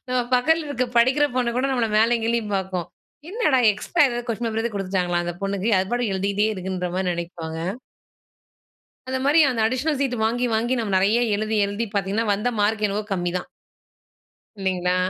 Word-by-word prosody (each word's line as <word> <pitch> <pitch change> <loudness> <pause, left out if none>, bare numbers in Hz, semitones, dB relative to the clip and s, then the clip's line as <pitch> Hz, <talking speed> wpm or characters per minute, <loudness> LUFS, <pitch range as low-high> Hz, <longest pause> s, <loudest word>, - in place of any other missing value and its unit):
நம்ம 250 0 +1
பக்கத்தில 315 +6 +2
இருக்கிற 255 -3 -1
படிக்கிற 265 +5 +4
பொண்ணு 245 -2 +1
கூட 260 - +1
நம்மள 245 -3 +1
மேலேயும் 230 +1 +3
கீழயும் 230 -3 -1
பார்க்கும். 185 -3 -3 0.4
"என்னடா? 380 - +2 0.2
எக்ஸ்ட்ரா 335 - +2
ஏதாவது 240 -1 -4
கொஸ்டின் 230 +1 -2
பேப்பர் 225 0 -2
ஏதாவது 230 -3 -3
குடுத்துட்டாங்களா? 185 -3 -1
அந்த 175 - -3
பொண்ணுக்கு 195 +1 -1
அது 190 +1 -1
பாட்டுக்கு 240 -5 0
எழுதிட்டே 200 +2 +1
இருக்குன்ற" 185 -1 -3
மாரி 190 -1 0
நெனைப்பாங்க. 170 -2 -6 1.5
அந்த 260 0 -1
மாரி 300 +4 +5
அந்த 235 -3 -1
அடிஷனல் 260 +5 0
சீட்டு 255 -4 0
வாங்கி, 240 +3 +1
வாங்கி 235 +3 +1
நம்ம 215 -4 -2
நெறைய 200 +5 +3 0.2
எழுதி, 215 +1 -1
எழுதி 205 +3 -3
பாத்தீங்கன்னா, 200 +3 0
வந்த 210 +5 -1
மார்க் 215 +1 +1
என்னவோ 205 +2 -2
கம்மிதான். 175 -1 -2 1.1
இல்லைங்களா? 185 -2 0
220 Hz, 165 wpm, -23 LUFS, 190-245 Hz, 1.5 s, மாரி